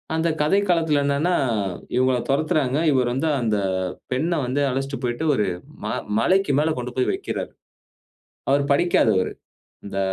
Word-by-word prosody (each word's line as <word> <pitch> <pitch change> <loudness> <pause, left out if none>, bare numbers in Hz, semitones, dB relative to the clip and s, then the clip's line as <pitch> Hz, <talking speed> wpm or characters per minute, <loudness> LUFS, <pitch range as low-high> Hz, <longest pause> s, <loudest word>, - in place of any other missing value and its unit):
அந்த 160 +1 +1
கதைக்களத்துல 165 -4 +2
என்னன்னா, 145 +6 +1 0.6
இவங்கள 130 0 +3
தொரத்துறாங்க. 145 -2 +1
இவர் 125 -2 +2
வந்து 155 +5 0
அந்த 110 -3 +1 0.5
பெண்ண 155 +7 0
வந்து 135 +3 -1
அழைச்சிட்டு 135 0 -3
போய்ட்டு 120 +5 -2
ஒரு, 105 - +1 0.4
ம - - -2 0.3
மலைக்கு 190 +5 +2
மேல 160 +1 +2
கொண்டு 125 0 -4
போய் 130 - +2
வக்கிறாரு. 395 - -4 1.0
அவரு 140 +1 +3
படிக்காதவரு. 110 - +2 0.5
இந்த 100 -1 -4
140 Hz, 130 wpm, -23 LUFS, 125-160 Hz, 1.0 s, இவங்கள